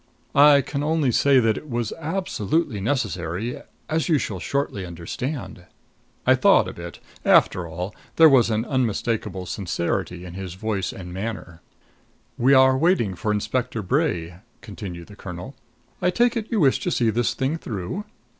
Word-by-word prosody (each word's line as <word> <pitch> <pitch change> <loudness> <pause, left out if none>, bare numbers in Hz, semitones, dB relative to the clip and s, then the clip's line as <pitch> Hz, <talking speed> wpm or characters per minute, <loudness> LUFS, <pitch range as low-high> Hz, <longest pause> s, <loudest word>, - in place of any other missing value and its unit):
"I 145 0 +7
can 140 +1 -4
only 150 -3 +1
say 135 +3 +4
that 115 -3 +2
it 150 - -15
was 120 -3 -2
absolutely 160 - -1
necessary 100 - -2 0.3
as 160 +2 -1
you 160 - +4
shall 105 -7 -3
shortly 140 -4 -2
understand." 90 - -6 0.6
I - - +6
thawed - - +4
a - - -6
bit. 85 0 -8 0.3
After 90 -2 +4
all, 90 +5 -5 0.2
there 165 - +8
was 130 -6 +5
an 110 +1 0
unmistakable 115 -7 -1
sincerity 90 -1 -3
in 90 - -9
his 95 -1 -6
voice 100 -1 -2
and 90 -2 -9
manner. 95 -4 -6 0.7
"We 135 +3 +4
are 130 0 +6
waiting 135 - +2
for 100 +5 -2
Inspector 115 +3 -1
Bray," 85 -2 -1 0.2
continued 95 -5 -8
the 105 - -14
colonel. 90 +5 -8 0.5
"I 180 - +3
take 240 +6 +2
it 225 -2 -2
you 225 - +1
wish 135 -3 +4
to - - -2
see 120 -9 +2
this 120 +1 0
thing 135 +5 -1
through?" 110 - -5
115 Hz, 160 wpm, -23 LUFS, 90-140 Hz, 0.7 s, there